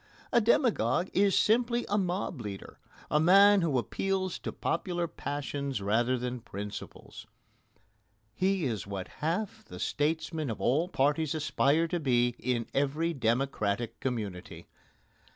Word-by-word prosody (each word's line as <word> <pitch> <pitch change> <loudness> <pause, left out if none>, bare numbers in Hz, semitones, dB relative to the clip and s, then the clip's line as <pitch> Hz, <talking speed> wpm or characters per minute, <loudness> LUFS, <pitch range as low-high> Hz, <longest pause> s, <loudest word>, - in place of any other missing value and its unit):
A 235 - +5
demagogue 200 - +2
is 200 0 +3
simply 235 +2 +2
a 205 - 0
mob 180 - -1
leader 100 -3 -8 0.3
a 150 - +4
man 195 +4 +6
who 155 -6 +1
appeals 190 +8 -1
to - - -5
popular 175 0 -2
passions 140 -3 -4
rather 115 +6 +1
than 125 0 -4
principles. 105 -3 -8 1.1
He 190 - +1
is 110 -6 -3
what 100 -2 -5
half 175 +7 -2
the 90 - -11
statesmen 155 - -1
of 110 - -4
all 150 +8 +2
parties 150 0 +1
aspire 155 +1 +2
to 175 - -1
be 120 -5 +2
in 120 -2 -1
every 150 +5 0
democratic 120 -4 -1
community. 105 -8 -4
145 Hz, 130 wpm, -30 LUFS, 120-180 Hz, 1.1 s, man